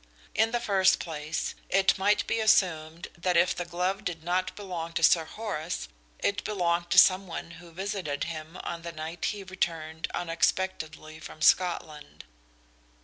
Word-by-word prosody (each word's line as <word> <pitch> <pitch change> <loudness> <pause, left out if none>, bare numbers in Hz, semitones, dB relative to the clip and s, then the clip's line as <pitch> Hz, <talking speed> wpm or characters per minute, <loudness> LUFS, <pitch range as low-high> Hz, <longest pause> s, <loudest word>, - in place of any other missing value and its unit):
In 220 +1 +3
the 240 +1 0
first 195 -5 +3
place, 155 -1 -3 0.2
it 190 0 +4
might 205 +2 +2
be 230 - 0
assumed 175 -6 +2
that 175 0 +1
if 175 +2 +4
the 175 - -3
glove 180 +4 -2
did 165 -4 -4
not 185 +2 -1
belong 175 -5 -5
to 165 - -1
Sir 165 0 +5
Horace 180 -4 -4 0.3
it 200 - -1
belonged 175 -4 0
to - - +1
some 190 +1 +7
one 170 0 -6
who 175 - -13
visited 185 -5 -3
him 160 0 -6
on 170 -1 -4
the 170 0 -6
night 160 +2 -5
he 205 -2 -2
returned 165 -4 -3
unexpectedly 165 -2 -1
from 155 - -10
Scotland. 155 -5 +1
175 Hz, 155 wpm, -28 LUFS, 160-190 Hz, 0.3 s, some